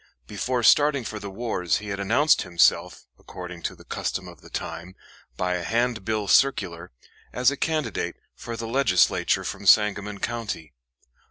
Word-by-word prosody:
Before 120 +5 -2
starting 145 +1 +5
for 110 -1 -6
the 100 -1 -7
wars 95 -5 -1
he 105 0 -7
had 100 0 -4
announced 120 +10 +3
himself, 85 -1 +2
according 90 -1 -9
to - - -4
the - - -16
custom - - -4
of - - -13
the - - -15
time, 85 +3 -6 0.4
by 90 0 0
a 90 -1 -2
handbill 110 -1 -1
circular, 90 -10 +2 0.4
as 125 +2 +3
a - - -3
candidate 155 -6 -2 0.2
for 115 -1 -7
the 115 - -5
Legislature 115 -7 +2
from - - -5
Sangamon 105 -1 +4
County. 105 -10 -4
105 Hz, 155 wpm, -25 LUFS, 90-120 Hz, 0.4 s, starting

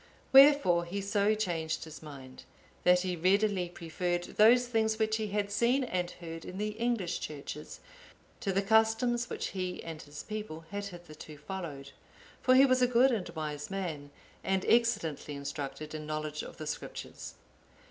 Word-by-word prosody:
Wherefore 270 -11 +7
he 190 +4 -4
so 200 +1 +2
changed 170 -6 -2
his 160 -1 -10
mind, 135 -4 -11 0.4
that 180 0 +5
he 180 -1 -2
readily 190 +1 +2
preferred 175 +1 -2
those 235 +6 +5
things 220 -2 +1
which 220 0 +1
he 220 -1 -2
had 205 0 -2
seen 240 +6 +2
and 180 -7 -2
heard 165 -2 -8
in 185 - -8
the 210 +1 -1
English 215 -5 -1
churches, 150 0 -7 0.6
to 195 - -1
the 195 +1 +1
customs 225 +3 +2
which - - -3
he 185 -2 -4
and 160 -2 -7
his 145 0 -9
people 210 -7 -6
had 205 0 -3
hitherto 170 -5 -10
followed. 150 -4 -7 0.5
For 255 - +5
he 270 +1 +8
was 255 -1 +3
a 250 - +5
good 250 +2 +4
and 215 -6 -2
wise 150 -2 -5
man, 170 -7 -4 0.3
and 190 -1 0
excellently 205 -11 +1
instructed 140 +2 -5
in 155 -1 -6
knowledge 155 0 -3
of - - -9
the 155 - -6
Scriptures. 150 - -6
185 Hz, 165 wpm, -31 LUFS, 155-220 Hz, 0.6 s, he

